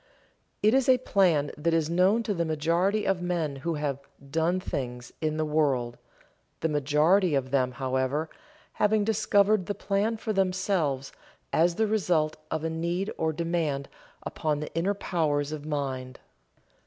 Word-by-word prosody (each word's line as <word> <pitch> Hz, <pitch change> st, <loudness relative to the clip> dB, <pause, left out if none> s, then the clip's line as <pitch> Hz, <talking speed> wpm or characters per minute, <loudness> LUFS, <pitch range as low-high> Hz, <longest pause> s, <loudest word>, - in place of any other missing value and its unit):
It 215 Hz, +2 st, +5 dB
is 265 Hz, -1 st, +3 dB
a 255 Hz, -, +7 dB
plan 180 Hz, -, +2 dB
that 165 Hz, +2 st, +1 dB
is 160 Hz, -2 st, +1 dB
known 185 Hz, +7 st, +3 dB
to 210 Hz, -, -1 dB
the 170 Hz, -3 st, 0 dB
majority 170 Hz, +6 st, +1 dB
of 190 Hz, -2 st, +1 dB
men 170 Hz, -5 st, -1 dB
who 165 Hz, +4 st, -2 dB
have 145 Hz, -2 st, -2 dB, 0.3 s
"done 165 Hz, +4 st, +1 dB
things" 125 Hz, -7 st, -5 dB
in 155 Hz, -1 st, -1 dB
the 155 Hz, -, 0 dB
world, 135 Hz, -6 st, 0 dB, 0.6 s
the -, -, +2 dB
majority 150 Hz, +4 st, +3 dB
of 130 Hz, -1 st, -1 dB
them, 130 Hz, -2 st, +1 dB
however, 130 Hz, +4 st, -1 dB, 0.5 s
having 210 Hz, 0 st, +2 dB
discovered 205 Hz, -2 st, +2 dB
the 205 Hz, -, -2 dB
plan 205 Hz, +3 st, 0 dB
for 220 Hz, 0 st, -3 dB
themselves 185 Hz, -8 st, 0 dB, 0.4 s
as 170 Hz, +1 st, +3 dB
the 220 Hz, -, +2 dB
result 180 Hz, -8 st, +1 dB
of 160 Hz, -1 st, -2 dB
a 165 Hz, -, 0 dB
need 170 Hz, +5 st, -2 dB
or 160 Hz, 0 st, 0 dB
demand 160 Hz, -4 st, -2 dB, 0.3 s
upon 150 Hz, -2 st, -2 dB
the 150 Hz, -, -6 dB
inner 185 Hz, +5 st, 0 dB
powers 150 Hz, -7 st, -1 dB
of 155 Hz, -1 st, -6 dB
mind. 130 Hz, -4 st, -3 dB
165 Hz, 155 wpm, -27 LUFS, 145-195 Hz, 0.6 s, a